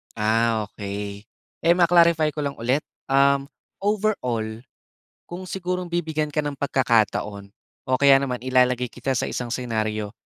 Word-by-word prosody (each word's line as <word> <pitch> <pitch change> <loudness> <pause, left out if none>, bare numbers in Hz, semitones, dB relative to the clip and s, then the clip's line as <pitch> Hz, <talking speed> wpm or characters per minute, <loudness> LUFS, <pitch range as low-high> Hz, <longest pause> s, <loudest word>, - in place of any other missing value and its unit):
Ah, 110 0 +1
okey. 100 0 -6 0.4
Eh 170 - +5
ma-clarify 170 -3 +4
ko 150 - -2
lang 140 0 -3
ulit, 130 +6 +1 0.2
um, 140 0 +3 0.3
overall 125 - -1 0.7
kung 175 +2 -7
sigurong 180 -1 -4
bibigyan 160 -3 -1
ka 150 - -1
ng 145 -1 -2
pagkakataon 110 -7 0 0.4
o - - -3
kaya 140 -1 +7
naman 125 -3 -2
ilalagay 125 -1 +2
kita 135 +4 -4
sa 125 - 0
isang 120 -1 -4
scenario. 110 -4 -2
130 Hz, 135 wpm, -23 LUFS, 110-155 Hz, 0.7 s, kaya